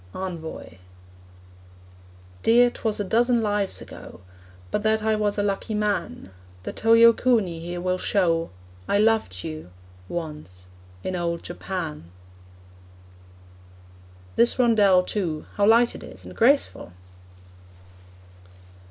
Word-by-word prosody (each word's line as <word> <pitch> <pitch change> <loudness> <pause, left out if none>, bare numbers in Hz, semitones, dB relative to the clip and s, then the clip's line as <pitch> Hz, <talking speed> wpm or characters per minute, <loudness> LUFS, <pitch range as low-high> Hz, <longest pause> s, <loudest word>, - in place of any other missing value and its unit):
ENVOY. 165 - -7 1.6
Dear, 240 +2 +5
'twas 220 -3 -2
a - - 0
dozen 235 +3 +2
lives 205 -2 -1
ago; - - -12 0.5
But - - 0
that 220 0 +1
I 220 0 +2
was 210 -1 -1
a 205 - +1
lucky 205 +2 -2
man 205 - -2 0.3
The - - -5
Toyokuni 230 -5 +4
here 175 +1 -5
will 185 +1 -1
show: 170 -5 +1 0.4
I - - +2
loved 215 - +1
you 80 +2 -7 0.4
once 150 - -7 0.4
in 185 - -3
old 170 -1 -2
Japan! 175 - -6 2.3
This 235 +1 +3
rondel, 210 -7 +4
too 175 -6 -3
how 205 0 +2
light 235 +2 +5
it - - -10
is, - - -12
and - - -10
graceful! 250 - +2
200 Hz, 110 wpm, -24 LUFS, 170-225 Hz, 2.3 s, Dear